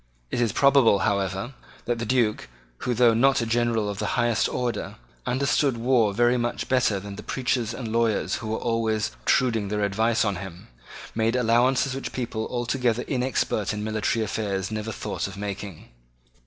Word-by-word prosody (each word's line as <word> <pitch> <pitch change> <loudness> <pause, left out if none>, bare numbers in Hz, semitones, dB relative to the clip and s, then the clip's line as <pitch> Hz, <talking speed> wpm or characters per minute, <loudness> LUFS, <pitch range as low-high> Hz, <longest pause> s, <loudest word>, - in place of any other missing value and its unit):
It - - 0
is 115 -3 +2
probable, 135 -4 +5
however, 100 +4 -1 0.3
that 120 -1 -1
the 115 - -3
Duke, 115 - +1 0.3
who, 125 - -1
though 120 -1 +5
not 135 +4 +4
a 115 - 0
general 115 -2 +1
of 100 -1 -4
the - - -1
highest 120 -2 +2
order, 125 -1 -3 0.3
understood 135 0 +1
war 115 -3 +3
very 120 +4 +3
much 120 0 -2
better 125 -6 +2
than 100 0 -8
the - - -6
preachers 125 -3 -1
and 115 -2 -5
lawyers 115 -2 +1
who 110 - -7
were 110 +1 -1
always 115 -2 0
obtruding 115 -6 +1
their 105 +1 -1
advice 110 +3 +1
on 100 -3 -1
him, 90 -2 -9 0.4
made 115 +1 +1
allowances 125 +2 +2
which 135 - -5
people 115 -3 -3
altogether 120 -1 0
inexpert 125 -6 -1
in 105 - -4
military 110 +1 0
affairs 100 -2 -2
never 110 +1 -3
thought - - -4
of 95 0 -9
making. 100 -3 -6
115 Hz, 170 wpm, -25 LUFS, 105-125 Hz, 0.4 s, probable